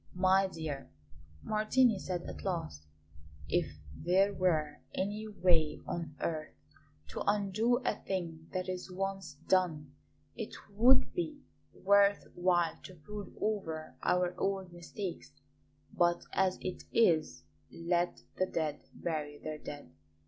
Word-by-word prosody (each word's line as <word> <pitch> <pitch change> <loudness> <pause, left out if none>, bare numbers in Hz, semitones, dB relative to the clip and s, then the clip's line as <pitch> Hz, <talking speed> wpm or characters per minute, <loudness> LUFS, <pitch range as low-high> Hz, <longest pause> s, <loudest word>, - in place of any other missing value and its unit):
"My 190 +1 +4
dear," 155 -6 -5 0.5
Martini 215 +1 +3
said 180 -2 -3
at - - -7
last; 165 - -3 0.6
"if 75 - 0 0.2
there 190 - +3
were 155 -6 +1 0.2
any 210 +3 -2
way 170 -6 +2
on 165 -4 -4
earth 155 -2 -3 0.5
to 70 - -5
undo 210 +4 +3
a - - +3
thing 170 -5 -4
that 185 -1 -2
is 185 0 -4
once 195 -3 -3
done, 160 -7 +2 0.4
it 220 - -5 0.2
would 245 +6 +5
be 315 -5 -3 0.3
worth 200 +1 +4
while 175 -2 +2
to 185 - -10
brood 205 +5 -8
over 165 -9 -2
our 180 0 +2
old 195 -2 -1
mistakes; 175 -1 -6 0.6
but 175 0 +3
as 190 -1 +2
it 185 - -4
is, 155 - +3 0.3
let 175 +1 0 0.2
the 185 - +2
dead 155 -4 -2
bury 150 -3 -3
their 155 0 -5
dead. 145 -5 -8
180 Hz, 125 wpm, -33 LUFS, 160-200 Hz, 0.6 s, would